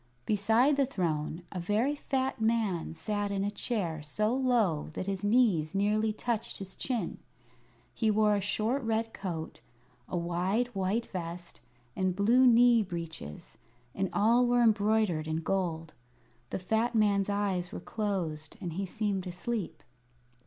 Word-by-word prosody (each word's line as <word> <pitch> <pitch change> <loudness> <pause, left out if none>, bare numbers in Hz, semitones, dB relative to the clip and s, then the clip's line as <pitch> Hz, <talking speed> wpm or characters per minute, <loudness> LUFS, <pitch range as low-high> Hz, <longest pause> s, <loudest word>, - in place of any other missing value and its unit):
Beside 225 +7 +3
the 280 - +4
throne 165 - -2
a 185 - -4
very 210 +10 +1
fat 265 -4 -2
man 220 -7 +1
sat 205 +6 -2
in 195 -1 -1
a 205 - -1
chair 190 -8 -1
so 210 +10 0
low 235 - +1
that - - -4
his 195 -1 -3
knees 205 -8 +3
nearly 210 +2 +2
touched 225 +1 -3
his 190 -1 -7
chin. 250 -4 -3 0.7
He 225 - +1
wore 210 0 +3
a 200 - 0
short 220 +7 0
red 225 -1 -1
coat, 165 -5 -5 0.5
a 180 - -2
wide 180 +8 0
white 200 +2 -1
vest, 175 -1 -6 0.3
and 185 -1 0
blue 235 +6 +5
knee 240 -1 +6
breeches, 165 - -7 0.3
and 195 -1 -1
all 230 +4 +4
were 245 0 +4
embroidered 210 -7 +2
in 160 +1 -1
gold. 165 -3 -2 0.6
The - - -2
fat 220 +6 0
man's 205 -2 +3
eyes 195 -3 -1
were - - -5
closed 175 -7 -3
and 175 -5 -5
he 195 +3 -3
seemed 200 -2 -2
asleep. 180 -3 -4
205 Hz, 145 wpm, -30 LUFS, 175-225 Hz, 0.7 s, knee